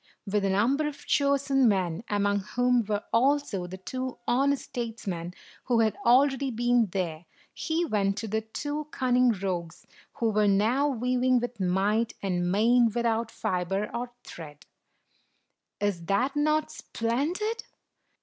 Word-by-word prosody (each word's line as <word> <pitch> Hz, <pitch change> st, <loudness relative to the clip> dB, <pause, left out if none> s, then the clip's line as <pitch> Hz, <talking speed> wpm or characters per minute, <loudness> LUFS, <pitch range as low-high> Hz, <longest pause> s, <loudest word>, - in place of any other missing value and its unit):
With 205 Hz, 0 st, 0 dB
a 195 Hz, -, +1 dB
number 250 Hz, +10 st, +2 dB
of 295 Hz, -, -8 dB
chosen 280 Hz, -2 st, +2 dB
men, 185 Hz, -2 st, 0 dB
among 205 Hz, 0 st, +1 dB
whom 245 Hz, +4 st, +1 dB
were 205 Hz, 0 st, -2 dB
also 250 Hz, -6 st, +1 dB
the 185 Hz, +1 st, -8 dB
two 255 Hz, +6 st, -5 dB
honest 275 Hz, +3 st, +2 dB
statesmen 205 Hz, -8 st, -5 dB, 0.3 s
who 240 Hz, -2 st, +2 dB
had 220 Hz, -1 st, +1 dB
already 270 Hz, +2 st, +4 dB
been 240 Hz, -1 st, +2 dB
there, 175 Hz, -3 st, -3 dB, 0.3 s
he 330 Hz, +1 st, -1 dB
went 200 Hz, -7 st, 0 dB
to 225 Hz, -, -4 dB
the 220 Hz, +1 st, -1 dB
two 290 Hz, +7 st, -4 dB
cunning 250 Hz, -3 st, +2 dB
rogues, 180 Hz, -5 st, -3 dB, 0.3 s
who 230 Hz, -2 st, 0 dB
were 210 Hz, 0 st, +2 dB
now 220 Hz, +8 st, +3 dB
weaving 255 Hz, -1 st, +1 dB
with 245 Hz, -1 st, -5 dB
might 200 Hz, +5 st, +1 dB
and 175 Hz, -2 st, 0 dB
main 235 Hz, +4 st, +4 dB
with 235 Hz, +2 st, -2 dB
out 230 Hz, 0 st, 0 dB
fiber 190 Hz, +1 st, -2 dB
or 240 Hz, +1 st, -3 dB
thread. 150 Hz, -3 st, -11 dB, 1.1 s
"Is 200 Hz, -4 st, -1 dB
that 250 Hz, +8 st, +1 dB
not 305 Hz, +1 st, +1 dB
splendid?" 335 Hz, -, -2 dB
230 Hz, 140 wpm, -27 LUFS, 195-260 Hz, 1.1 s, already